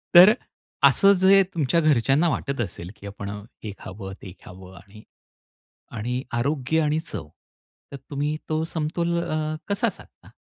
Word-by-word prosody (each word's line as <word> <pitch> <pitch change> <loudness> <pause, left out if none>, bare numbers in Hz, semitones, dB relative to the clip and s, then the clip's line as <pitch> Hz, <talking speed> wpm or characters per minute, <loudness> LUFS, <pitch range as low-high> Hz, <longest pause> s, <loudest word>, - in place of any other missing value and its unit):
तर 185 +5 +10 0.6
असं 200 0 +5
जे 195 +1 +7
तुमच्या 165 0 +1
घरच्यांना 145 +3 +3
वाटत 140 -2 -2
असेल, 90 -3 -6
की 100 -1 -11
आपण 100 0 -7 0.3
हे 105 - -4
खावं 95 0 -8
ते 90 -3 -9
खावं 95 0 -12
आणि 105 +3 -16 0.9
आणि 125 +4 -2
आरोग्य 140 +5 0
आणि 150 +1 +1
चव 75 -2 -6 0.6
तर 140 - -6
तुम्ही 145 +2 -1
तो 155 0 0
समतोल 170 +2 -1
अ, 155 0 -2
कसा 200 0 +1
साधता? - - -14
140 Hz, 145 wpm, -24 LUFS, 105-160 Hz, 0.9 s, तर